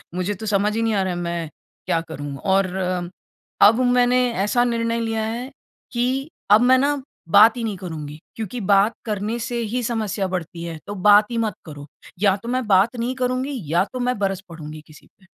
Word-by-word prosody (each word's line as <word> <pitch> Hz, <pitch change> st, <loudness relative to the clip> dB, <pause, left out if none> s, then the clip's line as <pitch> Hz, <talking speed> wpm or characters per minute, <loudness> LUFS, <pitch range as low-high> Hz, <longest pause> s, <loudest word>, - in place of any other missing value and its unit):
मुझे 185 Hz, +3 st, -1 dB
तो 220 Hz, +3 st, -8 dB
समझ 210 Hz, +1 st, +1 dB
ही 225 Hz, -, 0 dB
नहीं 225 Hz, -1 st, +1 dB
आ 195 Hz, -, +2 dB
रहा 185 Hz, -1 st, -2 dB
है, -, -, -4 dB
मैं 170 Hz, -2 st, -3 dB, 0.4 s
क्या 165 Hz, -, +1 dB
करूँ 145 Hz, -2 st, -6 dB
और 195 Hz, +2 st, +2 dB, 1.0 s
अब 220 Hz, +4 st, +7 dB
मैंने 245 Hz, 0 st, +3 dB, 0.3 s
ऐसा 240 Hz, +4 st, +2 dB
निर्णय 230 Hz, -1 st, 0 dB
लिया 225 Hz, -1 st, -1 dB
है 240 Hz, +4 st, -4 dB, 0.4 s
कि 260 Hz, +4 st, -1 dB, 0.2 s
अब 215 Hz, +3 st, +8 dB
मैं 255 Hz, +1 st, +5 dB
ना 285 Hz, +1 st, +1 dB, 0.3 s
बात 220 Hz, +5 st, +7 dB
ही 235 Hz, -, -3 dB
नहीं 210 Hz, -4 st, -3 dB
करुँगी। 155 Hz, -4 st, -7 dB, 0.2 s
क्योंकि 225 Hz, +2 st, -5 dB
बात 200 Hz, +3 st, +4 dB
करने 215 Hz, +2 st, -2 dB
से 235 Hz, +1 st, -3 dB
ही 250 Hz, -, 0 dB
समस्या 215 Hz, -4 st, -1 dB
बढ़ती 170 Hz, -2 st, -5 dB
है, 165 Hz, -2 st, -6 dB
तो 205 Hz, -, -5 dB
बात 205 Hz, +1 st, +8 dB
ही 235 Hz, -, -2 dB
मत 220 Hz, -2 st, 0 dB
करो। 145 Hz, -2 st, -10 dB, 0.3 s
या 195 Hz, -2 st, +4 dB
तो 235 Hz, -, -5 dB
मैं 255 Hz, -1 st, -1 dB
बात 200 Hz, +5 st, +4 dB
नहीं 245 Hz, +3 st, -2 dB
करुँगी 255 Hz, 0 st, -2 dB
या 175 Hz, +2 st, +4 dB
तो 255 Hz, -, -4 dB
मैं 250 Hz, -1 st, 0 dB
बरस 195 Hz, -1 st, -1 dB
पढूँगी 155 Hz, -2 st, -9 dB
किसी 155 Hz, -, -17 dB
पे। 190 Hz, -, -23 dB
215 Hz, 205 wpm, -22 LUFS, 185-240 Hz, 1.0 s, अब